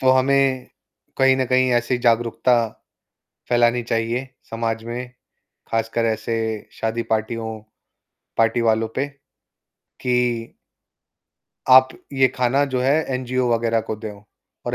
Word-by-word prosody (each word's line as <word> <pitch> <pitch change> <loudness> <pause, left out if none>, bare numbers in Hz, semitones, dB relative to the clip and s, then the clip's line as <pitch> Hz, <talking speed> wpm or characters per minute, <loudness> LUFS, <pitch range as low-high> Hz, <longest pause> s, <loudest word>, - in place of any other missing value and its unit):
तो 130 -1 +4
हमें 130 0 +2 0.5
कहीं 135 0 +5
न 130 - +1
कहीं 130 0 +3
ऐसी 120 +1 +1
जागरूकता 120 +1 +2 1.0
फैलानी 120 0 +3
चाहिए 115 +3 -1 0.2
समाज 115 0 -2
में, 120 +2 -5 0.6
खासकर 115 +1 0
ऐसे 110 +1 -1 0.4
शादी 115 +1 -1
पार्टियों 110 0 -2 0.8
पार्टी 115 +1 +3
वालों 110 0 +2
पे 140 +2 0 1.0
कि 125 -2 0 1.2
आप 130 0 +8 0.2
ये 130 -1 +4
खाना 130 +3 +2
जो 125 - +1
है 135 +2 +3 0.2
एनजीओ 130 -1 -1
वग़ैरह 115 0 +1
को 110 - -2
दो 110 -1 -7 0.5
और - - -1
120 Hz, 120 wpm, -22 LUFS, 115-130 Hz, 1.2 s, आप